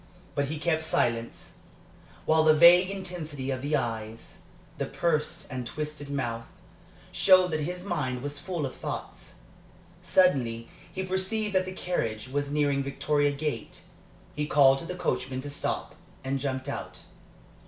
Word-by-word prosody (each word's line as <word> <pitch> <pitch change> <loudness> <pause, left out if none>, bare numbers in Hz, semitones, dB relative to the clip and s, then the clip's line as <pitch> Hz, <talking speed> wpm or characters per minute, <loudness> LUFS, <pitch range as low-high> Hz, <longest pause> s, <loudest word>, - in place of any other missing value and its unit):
But 140 - 0
he 155 +3 -4
kept 160 +1 0
silence, 115 -6 -1 0.7
while 160 0 +4
the 155 0 +6
vague 175 +3 +8
intensity 160 -8 -4
of 130 -1 -3
the 145 +2 0
eyes, 115 -3 -4 0.4
the - - -1
pursed 170 0 -1
and 125 -2 -4
twisted 150 0 -5
mouth, 120 -5 -3 0.6
showed 185 -2 +5
that 155 - 0
his 180 +4 -4
mind 130 -9 -2
was 145 0 -3
full 170 -3 -3
of 130 - -6
thoughts. - - -6 0.7
Suddenly 120 -11 +2 0.2
he 190 - -3
perceived 200 +3 -1
that 185 -1 +3
the 185 - -5
carriage 120 -12 -2
was 145 +1 -2
nearing 145 -2 +2
Victoria 145 +1 +1
Gate. 140 -5 -4 0.5
He 150 0 -1
called 135 -2 +5
to - - -7
the 180 - -4
coachman 130 -7 -2
to 145 +1 -7
stop, 145 - -2 0.3
and 135 +1 -1
jumped 130 -1 -3
out. - - -6
145 Hz, 150 wpm, -28 LUFS, 130-170 Hz, 0.7 s, vague